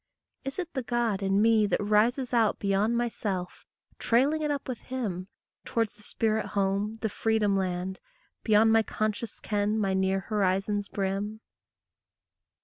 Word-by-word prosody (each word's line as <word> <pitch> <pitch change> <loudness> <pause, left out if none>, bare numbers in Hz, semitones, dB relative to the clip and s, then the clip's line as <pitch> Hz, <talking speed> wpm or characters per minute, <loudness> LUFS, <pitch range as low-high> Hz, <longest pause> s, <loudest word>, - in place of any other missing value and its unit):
Is 270 - -4
it 355 -3 -4
the 265 - -1
God 235 -4 0
in 195 +1 +2
me 220 -2 +4
that - - +1
rises 225 +5 +2
out 225 -3 +3
Beyond 205 +4 +1
my 240 0 +1
self, 190 -6 -4 0.3
trailing 275 +7 +2
it 300 - 0
up 285 -2 -2
with 255 -3 -4
him, 205 -9 -4 0.4
Towards 225 -2 -1
the 210 - -21
spirit 220 +1 -1
home, 200 +3 0
the - - +3
freedom 215 -2 +1
land, 185 0 -2 0.4
Beyond 220 0 +4
my 225 0 +5
conscious 215 +1 -3
ken, 210 0 0
my 195 -3 +1
near 190 0 +1
horizon's 200 0 0
brim? 200 +2 -2
210 Hz, 150 wpm, -28 LUFS, 195-230 Hz, 0.4 s, my